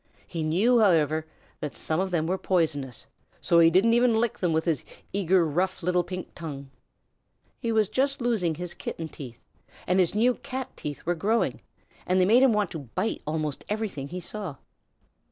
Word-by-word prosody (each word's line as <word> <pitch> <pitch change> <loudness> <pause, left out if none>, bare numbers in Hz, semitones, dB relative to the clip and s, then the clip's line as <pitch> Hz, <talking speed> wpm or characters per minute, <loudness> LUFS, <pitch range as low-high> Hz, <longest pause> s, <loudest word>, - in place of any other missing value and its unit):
He 165 - -5
knew, 195 +11 +3
however, 160 -6 +3 0.3
that 150 - -5
some 155 +1 -1
of 190 0 0
them 170 -3 0
were 185 +3 0
very - - -21
poisonous, 150 -8 0 0.3
so 170 - +4
he 165 0 +7
didn't 195 +7 +4
even 240 -1 +4
lick 230 0 0
them 175 -3 +1
with 160 0 +1
his 160 -7 0 0.3
eager, 190 -2 +3
rough 180 +4 -1
little 180 0 +2
pink 185 0 -7
tongue. 140 -5 -7 0.9
He 230 -3 -1
was 220 -2 +3
just 275 +5 0
losing 220 -10 0
his 175 +1 -5
Kitten 160 -1 -6
teeth, 125 -5 -10 0.5
and 180 +1 +2
his 180 +1 +2
new 240 +4 +4
Cat 260 +1 -6
teeth 145 -1 -6
were 175 - +2
growing, 210 +7 0 0.5
and 185 +1 +3
they 180 - +5
made 230 +6 +5
him 265 -2 +6
want 210 -4 +1
to 160 - -5 0.2
bite 190 +5 -1
almost 155 -2 -2
everything 210 -10 -3
he 180 +5 -5
saw. 180 -3 -6
180 Hz, 190 wpm, -27 LUFS, 160-215 Hz, 0.9 s, he